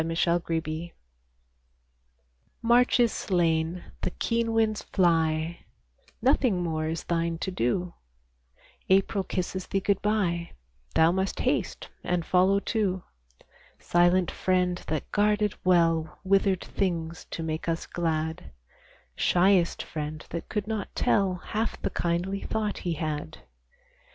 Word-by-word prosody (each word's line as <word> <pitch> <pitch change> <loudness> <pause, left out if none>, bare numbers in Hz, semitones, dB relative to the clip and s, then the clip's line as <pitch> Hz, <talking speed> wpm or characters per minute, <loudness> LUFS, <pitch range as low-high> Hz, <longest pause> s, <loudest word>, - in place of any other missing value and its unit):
GOD 160 - -2
SPEED 170 0 +3
TO 165 -1 0
THE 160 +2 -5
SNOW - - -22 1.7
March 240 +2 +4
is 235 -2 +4
slain; 170 -1 0 0.2
the - - 0
keen 230 +4 -1
winds 220 -2 +1
fly; 165 -2 +1 0.6
Nothing 250 -8 +3
more 155 -2 -1
is 160 +1 -3
thine 170 -1 -1
to 190 - -3
do; 175 +5 -1 1.0
April 195 +1 +3
kisses 185 0 -3
thee 195 - 0
good 195 0 0
bye; 185 -5 0 0.4
Thou 160 +1 +5
must 190 +1 -1
haste - - -1
and 175 -2 -1
follow 190 +2 +4
too; 200 -4 -1 0.7
Silent 175 +1 +3
friend 180 -1 0
that 155 -2 -3
guarded 210 0 +2
well 165 -3 +2
Withered 195 -1 +2
things 170 -3 -2
to 165 - -4
make 160 +1 -3
us 165 0 -1
glad, 160 -2 -2 0.7
Shyest 180 -1 +3
friend 155 0 -5
that 170 - -5
could 210 -2 -2
not 215 -2 -4
tell 195 -3 +2
Half 215 +5 -3
the - - 0
kindly 175 +3 -1
thought 215 -1 -2
he 175 -3 -2
had. 155 0 -4
180 Hz, 130 wpm, -27 LUFS, 165-195 Hz, 1.7 s, Thou